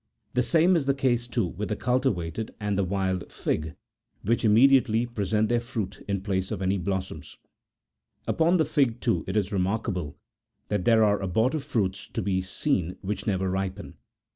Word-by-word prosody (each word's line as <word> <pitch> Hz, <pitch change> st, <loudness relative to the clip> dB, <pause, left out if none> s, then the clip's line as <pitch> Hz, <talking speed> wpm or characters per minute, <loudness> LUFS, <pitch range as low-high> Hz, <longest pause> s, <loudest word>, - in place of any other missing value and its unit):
The 125 Hz, -, +2 dB
same 170 Hz, +7 st, +4 dB
is 150 Hz, -5 st, 0 dB
the 140 Hz, -, +3 dB
case, 120 Hz, -3 st, +1 dB
too, 120 Hz, -4 st, 0 dB
with 95 Hz, +4 st, -5 dB
the 105 Hz, -, 0 dB
cultivated 110 Hz, -, -1 dB
and 105 Hz, -1 st, -1 dB
the 100 Hz, -, +1 dB
wild 95 Hz, -1 st, -2 dB
fig,78 80 Hz, +2 st, -2 dB, 0.5 s
which 115 Hz, +4 st, +1 dB
immediately 120 Hz, +1 st, +5 dB
present 110 Hz, -2 st, 0 dB
their 120 Hz, +1 st, +2 dB
fruit 110 Hz, -6 st, -5 dB
in 100 Hz, -2 st, -1 dB
place 95 Hz, -2 st, -1 dB
of 110 Hz, -, -3 dB
any 95 Hz, +1 st, 0 dB
blossom. 95 Hz, +1 st, -3 dB, 1.0 s
Upon 170 Hz, +3 st, +3 dB
the 160 Hz, -, +2 dB
fig, 130 Hz, -5 st, +1 dB
too, 115 Hz, -, 0 dB
it 95 Hz, +3 st, -1 dB
is 100 Hz, 0 st, 0 dB
remarkable 95 Hz, -, -2 dB, 0.5 s
that 105 Hz, -3 st, -1 dB
there 115 Hz, -2 st, +5 dB
are 105 Hz, -1 st, +2 dB
abortive 115 Hz, -, 0 dB
fruit 110 Hz, -10 st, 0 dB, 0.2 s
to -, -, -1 dB
be 95 Hz, -2 st, 0 dB
seen 95 Hz, -, -1 dB
which 105 Hz, +4 st, -4 dB
never 95 Hz, -2 st, 0 dB
ripen. 95 Hz, +1 st, -3 dB
105 Hz, 170 wpm, -26 LUFS, 95-120 Hz, 1.0 s, immediately